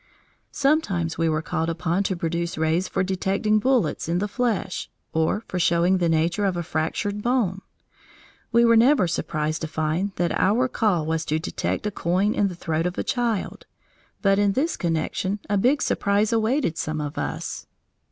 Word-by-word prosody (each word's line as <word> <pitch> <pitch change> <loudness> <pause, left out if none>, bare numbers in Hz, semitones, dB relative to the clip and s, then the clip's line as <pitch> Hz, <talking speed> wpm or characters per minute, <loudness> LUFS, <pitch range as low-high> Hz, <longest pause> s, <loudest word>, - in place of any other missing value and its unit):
Sometimes 200 - 0
we 165 0 +2
were 155 0 -1
called 160 +1 -1
upon 170 +2 0
to 190 - 0
produce 170 0 -2
rays 160 +4 +1
for - - -1
detecting 195 +3 +1
bullets 235 - +1
in 170 - +1
the 205 +3 -1
flesh, 225 -4 -2 0.2
or 160 +7 +1
for 180 - -3
showing 175 +2 +3
the 170 -2 +1
nature 165 +5 +1
of 190 -3 0
a 175 - -2
fractured 185 +6 -2
bone. 215 -6 0 0.9
We 235 0 +5
were 230 0 +5
never 235 -3 +5
surprised 155 -1 -2
to 160 - -2
find 160 +5 -1
that 175 -1 0
our 230 +7 +2
call 200 -10 +1
was 160 0 -1
to 155 - 0
detect 160 +5 -3
a 210 - 0
coin 190 +4 +1
in 205 - +2
the 180 - -5
throat 165 0 -1
of 180 - -5
a - - -1
child, 235 -5 -2 0.6
but 195 0 +4
in 205 -1 +3
this 310 - 0
connection 170 +4 -1
a 205 - 0
big 255 +9 +2
surprise 205 +2 +1
awaited 225 - +1
some 155 0 -2
of 150 -1 -4
us. - - -4
185 Hz, 180 wpm, -24 LUFS, 165-210 Hz, 0.9 s, We